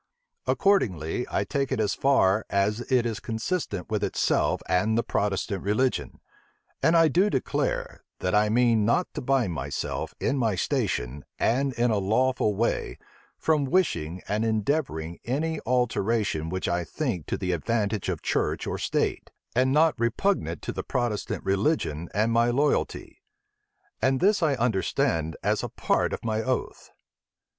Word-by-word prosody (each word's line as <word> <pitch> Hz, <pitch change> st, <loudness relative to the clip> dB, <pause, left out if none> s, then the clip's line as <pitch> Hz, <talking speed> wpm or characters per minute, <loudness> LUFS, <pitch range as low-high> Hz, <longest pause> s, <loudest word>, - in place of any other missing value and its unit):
Accordingly, 115 Hz, -, +1 dB
I -, -, 0 dB
take 140 Hz, -2 st, -2 dB
it -, -, 0 dB
as 105 Hz, -2 st, +1 dB
far 110 Hz, -7 st, +3 dB
as 100 Hz, +2 st, +1 dB
it 125 Hz, -2 st, +3 dB
is 115 Hz, -3 st, -2 dB
consistent 110 Hz, -, -3 dB
with -, -, 0 dB
itself -, -, +1 dB
and 105 Hz, +5 st, +2 dB
the 115 Hz, -, +2 dB
Protestant 100 Hz, -1 st, -1 dB
religion. 115 Hz, +6 st, 0 dB, 0.6 s
And 165 Hz, +1 st, +4 dB
I 165 Hz, -1 st, +6 dB
do 180 Hz, +8 st, +3 dB
declare, 130 Hz, -, -2 dB
that 90 Hz, -, -2 dB
I 105 Hz, 0 st, +4 dB
mean 115 Hz, -1 st, +3 dB
not 120 Hz, -, +1 dB
to -, -, -4 dB
bind 125 Hz, -8 st, +1 dB
myself, 70 Hz, -2 st, -4 dB
in 140 Hz, -, 0 dB
my 110 Hz, -5 st, +1 dB
station, 70 Hz, -5 st, -1 dB
and 135 Hz, +4 st, +1 dB
in 120 Hz, 0 st, +1 dB
a 105 Hz, -, +2 dB
lawful 110 Hz, +2 st, +1 dB
way, 115 Hz, +4 st, -1 dB, 0.4 s
from 155 Hz, -2 st, +2 dB
wishing 90 Hz, -, 0 dB
and 105 Hz, +2 st, 0 dB
endeavoring 110 Hz, -, -1 dB
any 155 Hz, +5 st, -1 dB
alteration 115 Hz, -8 st, 0 dB
which 95 Hz, +2 st, -2 dB
I 85 Hz, 0 st, 0 dB
think 105 Hz, -, -3 dB
to -, -, -1 dB
the 90 Hz, -, -2 dB
advantage 105 Hz, +3 st, -1 dB
of -, -, -3 dB
church -, -, 0 dB
or -, -, -3 dB
state, -, -, -1 dB, 0.3 s
and 130 Hz, +2 st, +3 dB
not 155 Hz, 0 st, +3 dB
repugnant 115 Hz, -, 0 dB
to -, -, -3 dB
the -, -, -4 dB
Protestant 120 Hz, -4 st, -2 dB
religion 95 Hz, -, 0 dB
and 110 Hz, +3 st, +1 dB
my 115 Hz, +1 st, +3 dB
loyalty: 140 Hz, +5 st, 0 dB, 0.8 s
and 130 Hz, 0 st, +2 dB
this 200 Hz, +2 st, +3 dB
I 150 Hz, -4 st, +2 dB
understand 95 Hz, -, 0 dB
as -, -, +1 dB
a -, -, -4 dB
part -, -, 0 dB
of -, -, -5 dB
my 110 Hz, -1 st, 0 dB
oath." 130 Hz, +2 st, -3 dB
115 Hz, 155 wpm, -26 LUFS, 95-130 Hz, 0.8 s, I